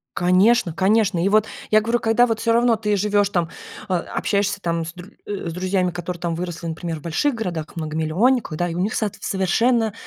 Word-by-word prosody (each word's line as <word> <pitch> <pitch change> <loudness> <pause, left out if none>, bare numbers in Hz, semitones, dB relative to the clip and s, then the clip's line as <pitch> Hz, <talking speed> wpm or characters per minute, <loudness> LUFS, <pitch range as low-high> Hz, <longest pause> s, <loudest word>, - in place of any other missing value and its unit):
Конечно 185 +2 +3
конечно. 195 -1 +2
И - - +2
вот 215 +1 +4 0.3
я 215 0 +6
говорю, 230 +2 0
когда 225 +2 +3
вот 225 -2 -1
всё 230 - +1
равно 235 0 +4
ты 210 -1 0
живешь, 205 0 +2
там, 175 -4 -1 0.4
а, 185 - +2
общаешься 200 +3 -1
там 170 -2 -1
с 170 - -7
др 180 +3 -12
э, 200 -4 -4
с - - -5
друзьями, 185 +1 0
которые 175 0 -5
там 170 -1 -1
выросли, 175 0 -5
например, 165 0 -4
в - - -17
больших 170 - 0
городах 175 -9 -4
многомиллионниках, 160 +6 0
да 175 +1 0
и 165 - -5
у - - -3
них 200 +4 0
соот 210 -3 -1
совершенно 220 +4 +1
190 Hz, 210 wpm, -22 LUFS, 170-220 Hz, 0.4 s, я